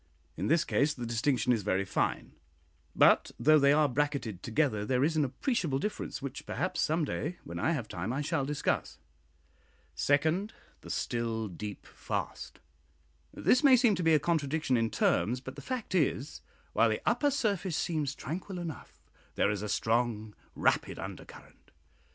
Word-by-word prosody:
In 90 Hz, +6 st, -2 dB
this 165 Hz, +4 st, +3 dB
case 150 Hz, -1 st, +1 dB
the 120 Hz, -, -5 dB
distinction 125 Hz, +1 st, +1 dB
is 115 Hz, -, 0 dB
very 100 Hz, -1 st, 0 dB
fine; 90 Hz, -, -1 dB, 0.6 s
but -, -, +5 dB
though 155 Hz, +6 st, +6 dB
they 140 Hz, 0 st, +5 dB
are 150 Hz, 0 st, +4 dB
bracketed 130 Hz, -8 st, -2 dB
together, 115 Hz, -3 st, 0 dB
there 125 Hz, +4 st, +1 dB
is 160 Hz, +2 st, +1 dB
an 155 Hz, -, +3 dB
appreciable 145 Hz, -, -1 dB
difference, 175 Hz, -4 st, -4 dB
which 140 Hz, 0 st, -6 dB
perhaps, 185 Hz, -1 st, -2 dB
some 160 Hz, +1 st, +1 dB
day 160 Hz, +4 st, -3 dB
when -, -, -6 dB
I 165 Hz, -, +1 dB
have 125 Hz, -8 st, -3 dB
time, 90 Hz, +4 st, -4 dB
I 135 Hz, +3 st, -1 dB
shall 150 Hz, -1 st, 0 dB
discuss. 145 Hz, +1 st, -1 dB, 1.0 s
Second, 155 Hz, -, +1 dB, 0.3 s
"The -, -, -11 dB
still 115 Hz, -2 st, -2 dB
deep 100 Hz, +2 st, -7 dB
fast." -, -, -5 dB, 0.7 s
This 255 Hz, -, +2 dB
may 275 Hz, -3 st, +8 dB
seem 240 Hz, -3 st, +4 dB
to 180 Hz, -, -2 dB
be 165 Hz, -2 st, +4 dB
a -, -, +4 dB
contradiction 150 Hz, -3 st, 0 dB
in 115 Hz, -1 st, +1 dB
terms; 120 Hz, +3 st, +1 dB
but 130 Hz, 0 st, -9 dB
the -, -, -8 dB
fact 255 Hz, -6 st, -4 dB
is, 150 Hz, -5 st, 0 dB, 0.3 s
while -, -, +4 dB
the -, -, -1 dB
upper 290 Hz, -, +2 dB
surface 200 Hz, -, -1 dB
seems 150 Hz, -5 st, -1 dB
tranquil 180 Hz, +5 st, -5 dB
enough, 170 Hz, -4 st, -8 dB, 0.3 s
there 100 Hz, -, +2 dB
is 105 Hz, -2 st, -3 dB
a 105 Hz, -, -4 dB
strong 110 Hz, -1 st, 0 dB, 0.2 s
rapid -, -, +1 dB
undercurrent. -, -, -10 dB
145 Hz, 165 wpm, -30 LUFS, 115-165 Hz, 1.0 s, may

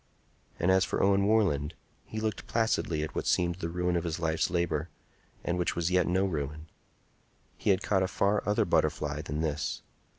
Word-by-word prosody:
And 90 Hz, -, +3 dB
as 95 Hz, 0 st, +5 dB
for -, -, -1 dB
Owen 100 Hz, 0 st, +4 dB
Warland, 85 Hz, -9 st, +2 dB, 0.3 s
he 110 Hz, -, -5 dB
looked 110 Hz, -1 st, -3 dB
placidly 110 Hz, -9 st, 0 dB
at 75 Hz, -, -5 dB
what -, -, -3 dB
seemed 85 Hz, -1 st, +2 dB
the 85 Hz, -3 st, -3 dB
ruin 90 Hz, +1 st, 0 dB
of 85 Hz, -, 0 dB
his 85 Hz, -1 st, -3 dB
life's 80 Hz, 0 st, +1 dB
labor, 85 Hz, -2 st, -1 dB, 0.5 s
and 90 Hz, +1 st, -1 dB
which 90 Hz, -, 0 dB
was 85 Hz, +1 st, 0 dB
yet 90 Hz, -1 st, +3 dB
no 95 Hz, +2 st, +2 dB
ruin. 75 Hz, -3 st, -3 dB, 0.9 s
He -, -, -2 dB
had 95 Hz, +1 st, +3 dB
caught 95 Hz, -2 st, +2 dB
a 95 Hz, -, +2 dB
far 100 Hz, +2 st, +1 dB
other 105 Hz, -, +2 dB
butterfly 75 Hz, 0 st, 0 dB
than 75 Hz, 0 st, -3 dB
this. 75 Hz, -2 st, -2 dB
90 Hz, 190 wpm, -29 LUFS, 80-95 Hz, 0.9 s, as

